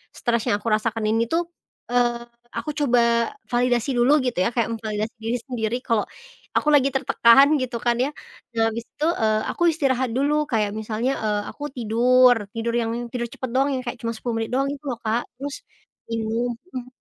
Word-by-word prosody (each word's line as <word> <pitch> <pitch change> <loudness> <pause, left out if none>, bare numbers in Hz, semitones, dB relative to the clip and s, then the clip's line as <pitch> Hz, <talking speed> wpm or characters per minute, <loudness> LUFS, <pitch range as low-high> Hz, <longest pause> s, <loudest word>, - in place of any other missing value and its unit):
stres 235 -2 0
yang - - +3
aku - - -5
rasakan 225 0 -2
ini 225 +1 +2
tuh, 335 +1 +1 0.4
eee, 240 -1 +1 0.3
aku 300 - -3
coba 235 -5 +2 0.2
validasi 245 +1 +1
dulu 245 +3 +4
gitu 245 -7 -1
ya, - - +2
kayak 235 -3 +2
memvalidasi 220 0 -3
diri 225 +2 -2
sendiri 240 -3 -2
kalau 225 -4 +1 0.5
aku - - +1
lagi 275 -2 +4
tertekan, 265 0 +6
gitu 255 -2 -3
kan 240 -1 +2
ya. 260 +3 +2 0.5
Nah 225 - +2
abis 230 +1 -5
itu, 300 +2 -1
eee, 215 -7 +1
aku - - -2
istirahat 260 -5 0
dulu, 280 +3 +2 0.2
kayak 210 -3 +1
misalnya, 220 +4 -1
eee, 210 -1 0
aku 290 - -10
tidur, 245 +2 +5 0.2
tidur 230 +1 -1
yang 225 -1 -1 0.2
tidur 240 -1 -2
cepet 255 +2 -6
doang 270 +2 +3
ya - - -2
kayak 240 -1 -5
cuma 230 - -1
10 230 +1 -3
menit 225 - -3
doang 275 +1 +1
itu 285 0 -8
loh 245 -3 -3
Kak. 225 +2 0
Terus, 275 +2 -5 0.6
ini 225 -1 -2 0.4
hmm. 250 -1 -6
240 Hz, 185 wpm, -23 LUFS, 225-260 Hz, 0.6 s, tertekan